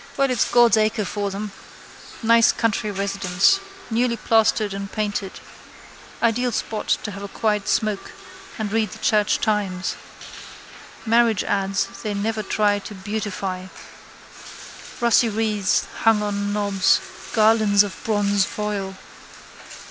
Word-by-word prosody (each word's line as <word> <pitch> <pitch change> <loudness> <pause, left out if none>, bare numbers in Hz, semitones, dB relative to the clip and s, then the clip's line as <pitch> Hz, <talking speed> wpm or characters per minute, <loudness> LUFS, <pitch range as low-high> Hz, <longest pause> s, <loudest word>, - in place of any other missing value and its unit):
Well 275 -1 +2
it's 250 - +1
God's 240 -2 +5
acre 215 0 +1
for 205 +1 -3
them. 200 +1 -5 0.7
Nice 230 0 +5
country 225 -1 -1
residence. 195 - +1 0.3
Newly 235 +1 +1
plastered 220 -2 +2
and 195 0 -6
painted. 205 -3 -3 0.9
Ideal 245 +2 +2
spot 220 -1 -3 0.2
to 210 - -4
have 200 0 -8
a 200 - -5
quiet 210 0 -1
smoke 215 -2 -1 0.5
and 215 -3 -3
read 220 -1 +1
the - - -9
Church 215 -5 +2
Times. 200 -4 -1 1.1
Marriage 230 -2 +3
ads 195 0 0 0.2
they 210 -2 -3
never 215 +2 -1
try 205 0 +1
to 205 +1 -9
beautify. 195 -2 -4 1.3
Rusty 235 -1 +4
wreaths 210 -2 0
hung 225 -2 +3
on 205 0 -2
knobs, 200 -2 +2 0.3
garlands 215 -2 +4
of 205 - -6
bronzefoil. 205 -1 -1
210 Hz, 120 wpm, -22 LUFS, 200-225 Hz, 1.3 s, God's